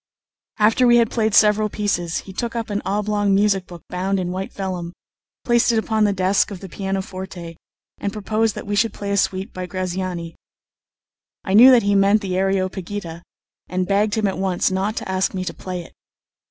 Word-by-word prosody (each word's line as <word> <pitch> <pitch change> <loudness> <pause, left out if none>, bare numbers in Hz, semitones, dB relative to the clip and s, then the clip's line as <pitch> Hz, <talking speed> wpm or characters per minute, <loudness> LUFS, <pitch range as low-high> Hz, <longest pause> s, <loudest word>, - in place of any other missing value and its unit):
After 225 +4 +4
we 240 0 +6
had 230 -2 +3
played 220 -3 +1
several 215 0 +4
pieces, 175 -6 -2
he 190 - -11
took 235 +4 -4
up 225 -2 -3
an 205 - -1
oblong 205 0 +1
music 195 -2 +2
book 175 -2 -11
bound 190 +2 -1
in 180 -1 -2
white 190 +1 -4
vellum, 180 -3 -5 0.5
placed 240 0 +3
it 230 - +1
upon 220 -1 +1
the 205 - +2
desk 190 0 +2
of 200 -3 -7
the 195 - -9
pianoforte, 190 -2 -5 0.4
and 200 - -2
proposed 215 +1 -1
that - - -7
we 205 0 -2
should 220 +1 +2
play 200 0 -4
a 200 - +1
suite 190 +2 -1
by 185 0 -5
Graziani. 180 -2 -4 1.1
I 190 - -2
knew 235 +6 +9
that 250 -3 +6
he 200 0 +2
meant 200 +2 +4
the 185 -3 -3
"Areopagita," 185 -2 -2 0.5
and 185 +1 -1
begged 205 +2 +1
him 220 -1 0
at 195 -1 -1
once 190 -1 0
not 195 +3 -1
to - - -5
ask 190 0 -1
me 185 0 -3
to - - -4
play 180 -2 -6
it. - - -16
195 Hz, 195 wpm, -21 LUFS, 185-210 Hz, 1.1 s, knew